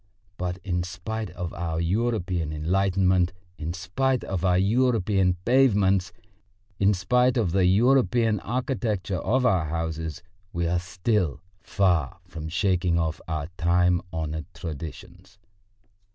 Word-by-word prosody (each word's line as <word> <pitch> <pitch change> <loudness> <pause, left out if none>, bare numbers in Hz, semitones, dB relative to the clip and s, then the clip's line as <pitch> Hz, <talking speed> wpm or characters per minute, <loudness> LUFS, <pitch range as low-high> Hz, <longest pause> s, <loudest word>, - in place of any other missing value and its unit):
But 90 -1 -3
in 90 -2 -1
spite 95 +5 -5
of 90 -2 -6
our 80 -2 -3
European 90 -3 0
enlightenment, 90 +2 +1 0.3
in 80 +2 -3
spite 125 +9 0
of 95 -2 -3
our 90 -1 +3
European 100 -3 +2
pavements, 105 -7 +3 0.7
in 100 +1 +4
spite 125 +7 +2
of 105 -8 +1
the 95 0 +3
European 115 +1 +3
architecture 110 - -2
of 130 +7 +1
our 95 -8 +3
houses, 80 0 -4 0.3
we 85 0 -1
are 85 +1 +1
still 90 -1 -1 0.2
far 90 -4 +1
from 80 -3 -7
shaking 90 -1 +1
off 80 +1 -1
our 80 -2 -3
time 90 +1 +3
honoured 80 -2 -4
traditions. 80 +3 -8
90 Hz, 125 wpm, -25 LUFS, 85-105 Hz, 0.7 s, in